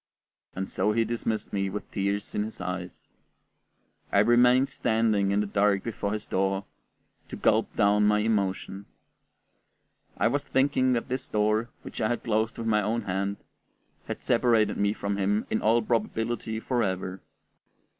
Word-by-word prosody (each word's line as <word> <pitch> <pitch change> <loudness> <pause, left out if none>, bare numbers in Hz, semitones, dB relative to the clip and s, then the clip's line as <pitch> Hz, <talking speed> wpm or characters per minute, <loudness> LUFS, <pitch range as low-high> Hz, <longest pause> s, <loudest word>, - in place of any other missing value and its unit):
And 95 +1 -3
so 105 - 0
he 115 +1 +2
dismissed 110 -1 -3
me 100 -1 0
with 105 +2 -6
tears 100 +1 -2
in - - 0
his 110 +1 -5
eyes. 90 -1 -6 1.0
I - - +2
remained 125 +5 +5
standing 110 -3 +1
in 100 +1 +2
the - - -1
dark 100 -1 +2
before 105 -3 -3
his 105 - -4
door, 95 +1 -1 0.6
to - - -6
gulp - - +1
down 105 +1 +4
my 105 0 +4
emotion. 100 -2 -1 1.3
I - - +3
was 140 +4 0
thinking 130 -1 +2
that 115 - -1
this 130 0 -3
door, 110 +2 +1
which - - -7
I 110 - +1
had 120 - -2
closed 110 0 0
with 115 - -4
my 105 -1 +2
own 110 +3 -1
hand, 100 +1 -2 0.7
had - - -5
separated 115 -3 +2
me 100 0 +1
from 100 -1 -3
him 100 +2 +1
in - - 0
all 115 +2 +3
probability 115 0 -1
forever. 95 -6 -2
105 Hz, 155 wpm, -27 LUFS, 100-115 Hz, 1.3 s, remained